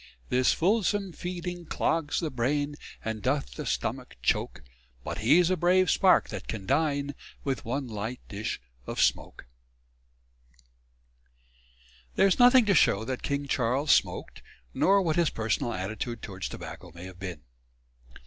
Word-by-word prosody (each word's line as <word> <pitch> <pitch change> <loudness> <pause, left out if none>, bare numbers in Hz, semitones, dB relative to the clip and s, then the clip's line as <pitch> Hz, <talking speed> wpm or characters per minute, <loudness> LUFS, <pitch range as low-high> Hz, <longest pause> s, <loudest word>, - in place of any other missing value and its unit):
This 125 0 +3
fulsome 200 0 +1
feeding 175 -1 -5
cloggs 160 -2 0
the 160 -3 -2
brain 145 +4 0 0.3
And 110 -1 -3
doth - - -1
the - - -6
stomach - - -3
choak - - 0 0.4
But - - -4
he's 160 +11 +4
a - - +3
brave 180 +2 +3
spark 190 -2 +4
that - - -6
can 105 -4 -5
dine 145 +1 +1 0.3
With 135 -2 -2
one 135 +3 -2
light 110 +2 -5
dish 105 +2 -4 0.3
of - - -5
smoak._ - - +1 2.7
There - - +5
is 195 - +3
nothing 245 0 +7
to 205 - +3
show 110 - +3
that 130 +1 -3
King 140 0 -2
Charles 135 +3 +1
smoked, - - +1 0.3
nor 195 0 +4
what 160 -2 0
his 170 -2 +3
personal 110 +1 -1
attitude 110 +5 -4
towards 95 -4 -5
tobacco 90 - -9
may 85 - -9
have 95 -1 -11
been. 90 -6 -6
140 Hz, 145 wpm, -28 LUFS, 110-175 Hz, 2.7 s, nothing